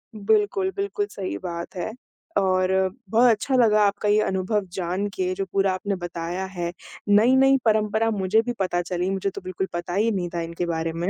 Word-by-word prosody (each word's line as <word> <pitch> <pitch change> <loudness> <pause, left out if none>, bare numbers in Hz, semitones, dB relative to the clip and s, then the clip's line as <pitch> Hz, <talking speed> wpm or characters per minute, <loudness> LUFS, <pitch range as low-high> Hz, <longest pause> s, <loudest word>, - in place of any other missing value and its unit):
बिल्कुल, 215 - +1
बिल्कुल, 405 +1 -1
सही 185 - -4
बात 170 - -6
है। 180 +4 -3 0.5
और 185 -1 +2 0.4
बहुत 240 +2 +5
अच्छा 235 +4 +1
लगा 215 -4 +4
आपका 205 +1 0
ये 210 +1 +4
अनुभव 190 +2 -1
जान 185 +2 -2
के 185 0 -1
जो 195 0 -2
पूरा 195 -1 +2
आपने 195 +2 -2
बताया 175 +2 -4
है, 175 -2 -4 0.4
नई-नई 260 +6 +5
परंपरा 220 0 +2
मुझे 205 +2 +2
भी 245 +1 -3
पता 175 -2 0
चली 180 +1 -2
मुझे 195 0 -1
तो 200 - -8
बिल्कुल 185 +1 -3
पता 175 0 -4
ही 220 +4 +2
नहीं 180 -4 -2
था 170 - -1
इनके 170 +1 -3
बारे 165 -1 -2
में। 170 +3 -2
195 Hz, 190 wpm, -24 LUFS, 180-215 Hz, 0.5 s, बहुत